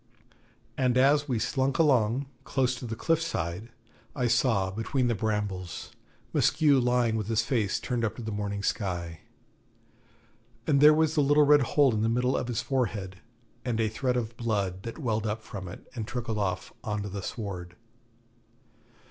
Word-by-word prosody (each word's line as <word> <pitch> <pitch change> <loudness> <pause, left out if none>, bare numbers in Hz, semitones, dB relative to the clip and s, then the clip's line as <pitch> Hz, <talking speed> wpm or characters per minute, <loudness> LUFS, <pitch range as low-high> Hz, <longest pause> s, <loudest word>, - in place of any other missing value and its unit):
And 125 -1 +2
as 145 +3 +4
we 125 - +1
slunk 135 +4 0
along, 130 -4 +3 0.2
close 130 -2 +1
to 125 -1 -6
the 115 - -4
cliff 165 +7 +1
side, 100 - -3 0.5
I 125 - 0
saw, 115 -5 +2
between 115 +5 -1
the - - +2
brambles, 100 -4 -3 0.4
Maskew 145 -2 +4
lying 120 -2 +2
with 105 -2 -3
his 115 0 +1
face 110 -4 0
turned 120 -2 -2
up 110 -1 -1
to 120 - -7
the 110 - -4
morning 100 -1 -3
sky. 85 -6 -2 1.5
And 140 -2 +3
there 150 +1 +9
was 160 0 +2
the 150 - +3
little 145 +1 +5
red 145 0 +6
hole 135 0 +3
in 105 - 0
the 115 - +2
middle 125 +3 +1
of - - -1
his 120 -3 -2
forehead, 105 -8 -2 0.5
and 120 -3 -1
a 110 -1 +2
thread 125 +3 -1
of 115 -1 -3
blood 100 -6 -1
that 115 +3 -7
welled 110 -6 -1
up 110 +1 -3
from 100 -4 -7
it 90 - -10
and 110 -4 -5
trickled 120 -4 -3
off 95 -2 -2
on 105 -2 -2
to 100 - -5
the 100 0 -5
sward. 90 -4 -6
115 Hz, 175 wpm, -28 LUFS, 105-130 Hz, 1.5 s, there